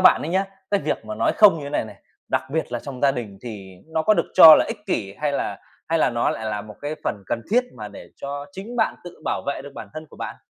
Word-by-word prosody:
bạn 185 - +6
ấy 155 - -3
nhá, 190 +3 +1 0.3
cái 200 -1 +2
việc - - -2
mà 215 - -5
nói - - +1
không 205 -6 +7
như 145 - -7
thế 140 - -6
này 145 - 0
này, 110 - -11 0.3
đặc - - +1
biệt 160 -4 -2
là 120 - -1
trong 135 -3 -8
gia 140 - +5
đình 110 -6 -6
thì 100 -6 -8
nó 160 0 -1
có 215 +5 +4
được - - 0
cho 160 -1 +12
là - - +3
ích 215 -2 -7
kỷ? 100 - -2
Hay 150 -1 0
là - - -2 0.3
hay 165 - +2
là - - +3
nó 120 -1 +1
lại 110 - -4
là 105 -1 -2
một 105 -1 -11
cái 150 +2 -2
phần 100 - -2
cần 115 - -2
thiết 245 +3 +4
mà 105 -1 -6
để - - -12
cho 140 +1 -5
chính 215 +6 -7
bạn 220 - +2
tự 175 - -11
bảo - - -1
vệ 140 - -2
được 145 - -10
bản - - -8
thân 155 0 -7
của - - -16
bạn? - - -6
145 Hz, 290 wpm, -23 LUFS, 115-185 Hz, 0.3 s, cho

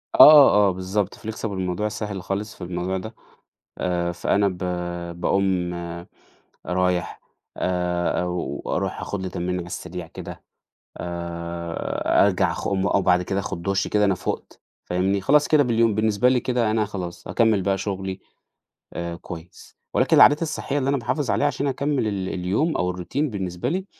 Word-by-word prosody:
آه 150 -2 +10 0.2
آه - - +3
بالضبط 95 +2 -2
flexible 110 +1 -6
الموضوع 95 +2 -2
سهل 105 -2 -4
خالص 100 +3 -3
في - - -9
الموضوع 90 +1 -2
ده، 110 +4 -7 0.6
آآ 90 -1 -1
فأنا 100 +4 +1
ب 95 -2 -3 0.6
باقوم 95 -2 +1 0.9
رايح 90 0 0 0.4
آآ 90 -1 0
أو 90 -6 -3
أروح - - -2
آخد 100 - -4
لي 95 - -3
تمرينة 90 +1 -2
على 85 - -5
السريع 90 0 -6
كده، - - -9 0.5
آآ 85 -1 -1
أرجع - - +2
أخ - - -4
أقوم 100 0 0
آه 100 - +2
بعد 90 -1 +3
كده 95 +2 -2
آخد 85 - -4
دُش 95 +1 0
كده 105 -1 +2
أنا 100 - +2
فُقت - - -5 0.2
فاهمني، 95 +2 0
خلاص 145 +8 +4
كده 150 -2 +5
باليوم 115 -3 +2
بالنسبة 110 +3 +3
لي 130 -1 +3
كده 120 -3 0
أنا 110 -1 +1
خلاص 90 -4 -6
هاكمل 110 -4 +2
بقى 95 +1 +1
شغلي 95 -1 -4 0.7
آآ 85 0 -4
كويس، 85 0 -11 0.2
ولكن - - +3
العادات 145 +2 +7
الصحية 150 -3 -2
اللي 135 -1 0
أنا 140 - +2
باحافظ 140 +3 -2
عليها 145 - +2
عشان 140 0 -1
أكمل 140 -3 0
ال 95 -3 -2
اليوم 95 - 0
أو 90 0 0
الroutine 90 - -9 0.3
بالنسبة 90 -3 -3
لي 185 +5 -2
95 Hz, 165 wpm, -23 LUFS, 90-110 Hz, 0.9 s, آه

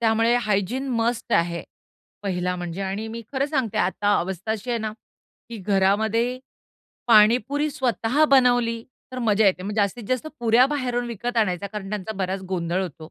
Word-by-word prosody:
त्यामुळे 225 +1 +3
hygiene 210 +7 0
must 235 0 -1
आहे 170 0 +1 0.6
पहिला 180 -2 -1
म्हणजे 175 +1 -5
आणि 195 +3 -3
मी 230 +1 -6
खरं 270 0 +1
सांगते 260 -8 -1
आता 205 +3 +2
अवस्था 190 +3 -4
अशी 225 +3 -5
आहे 235 - 0
ना, 215 -1 -3 0.6
की 230 - -7
घरामध्ये 215 +5 +1 0.7
पाणीपुरी 245 +7 +4
स्वतः 260 0 +1
बनवली, 245 -3 +3 0.3
तर 255 - -5
मज्जा 215 -3 +3
येते. 185 -1 +2
मग 205 - -4
जास्तीत 205 +3 0
जास्त 255 +4 -1
पुऱ्या 235 +2 +5
बाहेरून 250 -4 -2
विकत 240 +1 -4
आणायचा 200 -4 +1
कारण 200 -1 -7
त्यांचा 210 +1 -4
बराच 190 +1 -2
गोंधळ 175 +1 -1
होतो. 175 -6 -6
220 Hz, 160 wpm, -24 LUFS, 195-245 Hz, 0.7 s, पुऱ्या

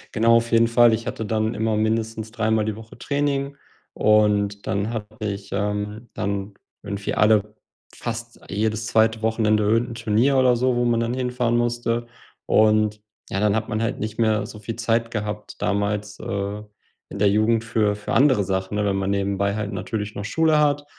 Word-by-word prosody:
Genau, 115 +1 +5
auf 115 0 -2
jeden 115 0 +5
Fall. 120 0 +5
Ich 115 +2 -2
hatte 110 - -4
dann 110 +1 -1
immer 110 0 0
mindestens 110 0 -1
dreimal 110 -2 +1
die 110 -1 -2
Woche 110 +1 -13
Training 140 0 -1 0.4
und 105 -1 +2
dann 100 +3 -1
hatte 110 -2 -6
ich 100 -1 -4
ähm, 105 +3 -3
dann 100 0 -3 0.3
irgendwie 100 -1 -4
alle 105 0 +3 0.4
fast 115 0 -6
jedes 110 +2 -1
2. 110 -1 +2
Wochenende 110 -1 +2
irgend 115 +4 +2
'n 115 - -7
Turnier 115 +4 +2
oder 130 -1 +4
so, 125 +1 +1
wo 120 0 +1
man 120 -1 +2
dann 115 +1 -1
hinfahren 125 -2 0
musste. 120 0 -1 0.4
Und 110 -1 +3 0.3
ja, 100 - -1
dann 105 0 +2
hat 110 0 -2
man 110 -1 -1
halt 115 +2 -1
nicht 110 +1 -5
mehr 110 -2 +2
so 105 -1 -10
viel 110 +2 -5
Zeit 115 0 0
gehabt 105 -2 -5
damals, 100 0 -1
äh, 100 +1 -3 0.5
in - - -7
der 105 - +3
Jugend 110 +2 +2
für 110 -3 +1
für 105 - -5
andere 130 -6 +4
Sachen, 95 +1 -2
ne? 105 0 0
Wenn 100 -1 +1
man 95 0 -1
nebenbei 100 0 0
halt 105 -1 -3
natürlich 105 +1 -4
noch 100 - -5
Schule 155 +7 +2
hat 145 -1 +2
110 Hz, 185 wpm, -23 LUFS, 105-115 Hz, 0.5 s, Genau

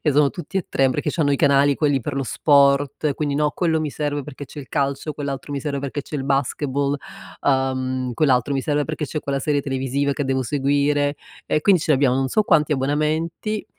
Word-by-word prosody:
e 150 - +2
sono 145 0 +4
tutti 190 +2 -7
e 185 - -1
3 135 -1 +2
perché 145 - -1
c'hanno 145 -5 +1
i - - +2
canali, 140 -1 +4
quelli 145 -2 +1
per 120 - -4
lo 140 - -1
sport, 140 +2 +3
quindi, 145 -2 -2
no, 150 0 +2
quello 160 0 0
mi 150 -2 -2
serve 145 -1 -2
perché 145 +1 -8
c'è 150 - -11
il 135 - -12
calcio, 140 +1 -1
quell'altro 140 -1 -5
mi 140 - -2
serve 140 -1 -3
perché 140 +1 -4
c'è 150 - -6
il 135 - -3
basketball, 140 +1 0 0.4
uhm, 130 -2 0
quell'altro 130 0 +2
mi 135 - 0
serve 145 -1 0
perché 155 -1 -3
c'è 155 +3 -4
quella 140 -1 -2
serie 145 0 +1
televisiva 135 +1 -1
che 145 - -2
devo 130 0 0
seguire, 145 +2 +1 0.3
e 155 - +1
quindi 185 +1 +4
c'abbiamo 135 -4 +3
non 135 0 0
so 215 - +2
quanti 155 -6 +3
abbonamenti. 155 +9 -1
145 Hz, 210 wpm, -22 LUFS, 135-150 Hz, 0.4 s, sono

